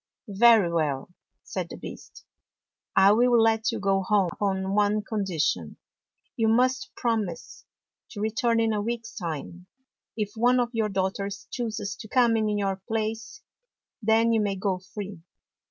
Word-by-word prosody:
" - - -66
Very 210 -3 +5
well," 155 0 -1 0.3
said - - -5
the - - -8
Beast. - - -11 0.3
" - - -61
I 195 +1 +7
will 240 +2 +4
let 225 +1 +3
you 230 - -4
go 195 -1 +1
home 195 -1 +2
upon 190 -1 -1
one 210 +1 +2
condition. 175 - -2 0.6
You 225 - +1
must 255 +4 +2
promise 220 -8 -3 0.4
to 205 - -9
return 230 +2 +1
in 225 -1 +2
a 210 - -1
week's 230 +1 -4
time. 175 0 -6 0.5
If 210 -2 -2
one 245 +3 +3
of 240 -1 +1
your 220 -2 0
daughters 195 +1 -2
chooses 220 -5 -3
to - - -9
come 240 0 +3
in 215 -1 +1
your 195 -1 -1
place, 225 +1 -3 0.6
then 225 +1 +3
you 220 - +3
may 200 -2 0
go 190 -1 -1
free." 190 -1 -8
210 Hz, 155 wpm, -26 LUFS, 195-225 Hz, 0.6 s, I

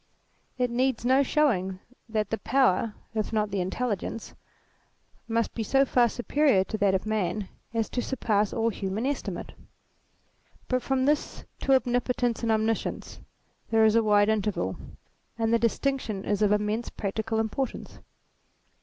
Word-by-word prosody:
It 250 -1 0
needs 250 -1 0
no 260 +2 +5
showing 215 -11 +1 0.3
that 215 -2 -1
the 225 - -1
power 235 -5 +2 0.2
if 215 -1 -2
not 215 -2 0
the 195 -1 0
intelligence, 215 +3 -3 0.9
must 230 0 0
be 230 - -3
so 270 +5 +3
far 245 -2 +3
superior 250 -3 +2
to 215 - -4
that 200 -2 +3
of 190 - -2
Man, 210 -2 -1 0.2
as 225 -1 0
to 245 - -1
surpass 215 -5 0
all 230 0 +1
human 200 +2 -3
estimate. 285 +1 -3 1.2
But 255 -1 +1
from 265 0 0
this 295 +1 0
to 270 - +3
Omnipotence 245 -1 0
and 230 -1 +1
Omniscience 220 +1 -1 0.5
there 225 -1 +4
is 215 - +5
a 230 - +5
wide 205 -1 +4
interval. 205 - 0 0.6
And 225 0 +1
the 230 - +4
distinction 230 -3 -1
is 205 0 0
of 210 -1 +4
immense 210 +3 0
practical 220 +2 -3
im 220 0 +1
portance. 265 +2 -4
225 Hz, 150 wpm, -27 LUFS, 210-250 Hz, 1.2 s, no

